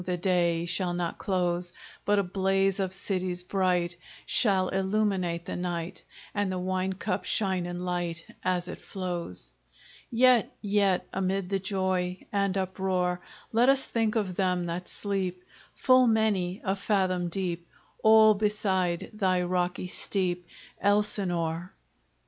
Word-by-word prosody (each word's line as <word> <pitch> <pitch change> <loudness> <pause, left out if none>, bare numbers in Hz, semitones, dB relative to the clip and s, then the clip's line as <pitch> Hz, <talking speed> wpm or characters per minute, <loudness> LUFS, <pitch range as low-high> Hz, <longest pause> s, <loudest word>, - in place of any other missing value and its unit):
the 180 0 -2
day 170 -2 +1
Shall 175 0 -1
not 175 -1 -3
close, 175 -2 0 0.3
But 205 0 +3
a 200 - +3
blaze 195 +1 +1
of 190 -1 -1
cities 185 -2 0
bright 180 -2 0 0.3
Shall 190 -4 +2
illuminate 190 -3 0
the - - -4
night, 175 -1 -4 0.3
And 205 -2 0
the 185 - -2
wine 185 +1 -1
cup 185 +1 -2
shine 190 -4 0
in 175 0 -5
light 175 -2 -3 0.2
As 180 -1 0
it - - -7
flows! 175 - -4 0.6
Yet 245 0 +4
yet 200 -3 +1
amid 190 0 -1
the 195 -1 0
joy 185 -1 -1
And 200 -1 +1
uproar, 185 -1 -1 0.3
Let 235 +3 +4
us 270 0 +4
think 225 -1 0
of 200 -5 0
them 180 -2 +1
that 175 +1 -4
sleep 190 -3 -2 0.3
Full 255 -1 +5
many 210 -4 +1
a 190 0 +1
fathom 185 -3 0
deep 175 -1 -3 0.3
All 220 0 +7
beside 195 -4 0
thy 185 -4 +1
rocky 180 0 -1
steep, 180 -1 -1 0.3
Elsinore! 185 -4 +1
185 Hz, 135 wpm, -28 LUFS, 180-200 Hz, 0.6 s, All